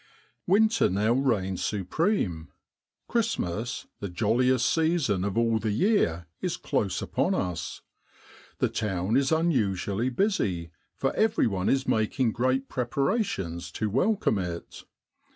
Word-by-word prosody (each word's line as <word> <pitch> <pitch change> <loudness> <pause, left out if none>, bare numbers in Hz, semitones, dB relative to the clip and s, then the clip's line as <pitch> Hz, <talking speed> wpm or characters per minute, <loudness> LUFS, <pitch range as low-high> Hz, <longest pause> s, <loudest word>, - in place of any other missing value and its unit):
Winter 220 +4 +4
now 105 +5 +2
reigns 100 -9 0
supreme. 95 - -1 0.6
Christmas, 125 - -1
the 100 - -4
jolliest 120 +6 +2
season 160 - +1
of 100 +1 -2
all 115 -1 +2
the 110 - -2
year, 105 - +2 0.2
is - - -2
close - - -1
upon - - 0
us. 90 -2 -3 0.8
The - - +2
town 95 0 -1
is 135 +2 +2
unusually 120 - +1
busy, 105 - 0 0.2
for 135 - -1
everyone 115 - +1
is 135 0 +1
making 110 +2 +1
great 130 +3 0
preparations 125 - -1
to 110 -2 -2
welcome 160 - +2
it. 85 -2 -6
115 Hz, 115 wpm, -27 LUFS, 95-140 Hz, 0.8 s, Winter